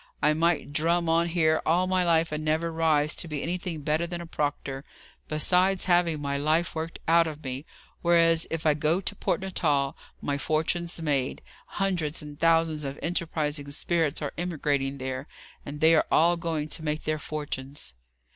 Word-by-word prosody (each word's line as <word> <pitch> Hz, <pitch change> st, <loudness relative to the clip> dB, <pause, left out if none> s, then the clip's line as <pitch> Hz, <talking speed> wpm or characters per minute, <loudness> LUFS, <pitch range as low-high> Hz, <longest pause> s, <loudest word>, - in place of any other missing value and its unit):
I 150 Hz, +1 st, +3 dB
might 160 Hz, -2 st, +1 dB
drum 170 Hz, +3 st, +1 dB
on 165 Hz, +1 st, +3 dB
here 160 Hz, -2 st, +2 dB
all 175 Hz, +3 st, +2 dB
my 185 Hz, 0 st, +2 dB
life 165 Hz, -2 st, +2 dB
and 155 Hz, 0 st, -3 dB
never 160 Hz, +2 st, 0 dB
rise 155 Hz, -2 st, +2 dB
to -, -, -5 dB
be 150 Hz, -3 st, -4 dB
anything 175 Hz, -2 st, -3 dB
better 155 Hz, +3 st, 0 dB
than 175 Hz, 0 st, -5 dB
a 170 Hz, -, -6 dB
proctor, 145 Hz, -3 st, -3 dB, 0.4 s
besides 180 Hz, +5 st, +2 dB
having 175 Hz, -3 st, +3 dB
my 140 Hz, -1 st, -2 dB
life 155 Hz, +4 st, +1 dB
worked 160 Hz, +1 st, -4 dB
out 165 Hz, 0 st, +5 dB
of 155 Hz, -1 st, -7 dB
me; 130 Hz, +3 st, -5 dB, 0.3 s
whereas, 165 Hz, -1 st, +4 dB
if 165 Hz, 0 st, -4 dB
I 155 Hz, -, +5 dB
can 155 Hz, +2 st, +1 dB
get 190 Hz, -, -6 dB
to 200 Hz, -, -2 dB
Port -, -, -1 dB
Natal, 145 Hz, -7 st, 0 dB, 0.2 s
my 140 Hz, 0 st, -2 dB
fortune's 165 Hz, +4 st, -1 dB
made. 140 Hz, -4 st, -1 dB, 0.2 s
Hundreds 175 Hz, -6 st, -1 dB
and 145 Hz, 0 st, -10 dB
thousands 165 Hz, -2 st, +3 dB
of 140 Hz, 0 st, -4 dB
enterprising 155 Hz, -4 st, -2 dB
spirits 160 Hz, 0 st, 0 dB
are 145 Hz, -, -3 dB
emigrating 145 Hz, -5 st, -1 dB
there, 130 Hz, +1 st, -4 dB, 0.4 s
and 145 Hz, +1 st, -7 dB
they 160 Hz, +1 st, +6 dB
are 160 Hz, -, +3 dB
all 170 Hz, +2 st, +4 dB
going 165 Hz, -3 st, -2 dB
to -, -, -4 dB
make 150 Hz, 0 st, -2 dB
their 155 Hz, 0 st, -1 dB
fortunes." 145 Hz, -, -6 dB
160 Hz, 180 wpm, -27 LUFS, 150-170 Hz, 0.4 s, they